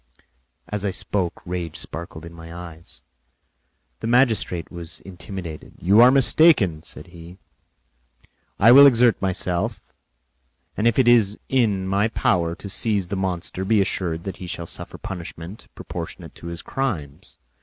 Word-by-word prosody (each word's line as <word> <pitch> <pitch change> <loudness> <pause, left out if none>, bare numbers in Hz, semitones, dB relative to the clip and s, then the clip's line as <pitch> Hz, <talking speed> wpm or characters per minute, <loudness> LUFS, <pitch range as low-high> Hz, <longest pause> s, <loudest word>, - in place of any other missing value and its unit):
As 105 -2 -4
I 100 - 0
spoke, 95 -1 -3
rage 85 -2 -4
sparkled 85 -1 -8
in 85 - -11
my 80 0 -11
eyes; 85 -1 -11 1.0
the - - -4
magistrate 115 -9 +1
was 85 -1 -8
intimidated. 90 -3 -8
"You 100 +6 +4
are 125 - +9
mistaken," 130 - +4
said - - -11
he. 85 +1 -12 1.2
"I 115 +4 +7
will 140 +3 +10
exert 120 -3 +4
myself, 90 -2 -1 0.9
and 110 - +1
if 120 - +2
it 130 -3 +3
is 110 -4 +4
in 105 -8 +1
my 100 +3 +2
power 85 -6 0
to 100 - -10
seize 100 -2 -1
the 100 - -2
monster, 95 -1 -3
be 105 +2 +2
assured 85 -4 -1
that 95 - -6
he 90 - -8
shall 85 -1 -5
suffer - - -8
punishment 85 +1 -8
proportionate - - -8
to 85 - -11
his 85 0 -7
crimes. 85 - -4
95 Hz, 145 wpm, -22 LUFS, 85-110 Hz, 1.2 s, will